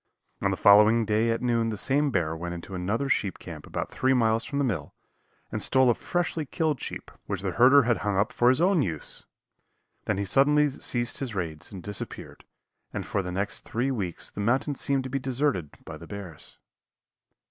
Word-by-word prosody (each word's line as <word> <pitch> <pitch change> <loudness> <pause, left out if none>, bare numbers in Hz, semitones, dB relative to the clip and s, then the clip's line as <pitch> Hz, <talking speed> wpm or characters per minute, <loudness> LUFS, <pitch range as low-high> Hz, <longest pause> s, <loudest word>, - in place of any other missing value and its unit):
On - - +2
the - - -1
following 105 +3 +6
day 110 +2 +1
at 115 +2 -1
noon 115 -2 +1
the 110 - -4
same 140 +7 +1
bear 85 -9 0
went 85 +1 -5
into 85 +3 -9
another 100 +9 -1
sheep 100 -7 0
camp 80 -4 -10
about - - -4
three 130 0 +2
miles 115 -2 +2
from 140 - -4
the 140 - +2
mill, 90 - -3 0.6
and - - -3
stole 130 -2 +4
a - - +3
freshly 170 +3 -2
killed 150 0 -1
sheep, - - -6 0.2
which 100 -1 -3
the 95 - -1
herder 130 +9 +6
had 115 -1 +2
hung 105 -2 -1
up 100 +2 +1
for 120 - +4
his 130 +2 +3
own 180 -2 +4
use. 80 - -4 0.8
Then - - 0
he 100 - -1
suddenly 145 +8 +4
ceased 120 -2 -2
his 125 -6 -4
raids 80 -5 -4
and 95 -4 -8
disappeared 105 -1 -8 0.5
and - - -4
for 100 - -1
the 90 -1 -5
next 100 +3 -2
three 120 +3 -2
weeks 95 -9 -3
the - - -5
mountain 130 +7 +1
seemed 135 0 0
to 130 - -6
be 135 - 0
deserted 130 - -1 0.2
by 75 - -8
the 85 +2 -12
bears. 100 -7 -9
115 Hz, 200 wpm, -27 LUFS, 95-130 Hz, 0.8 s, following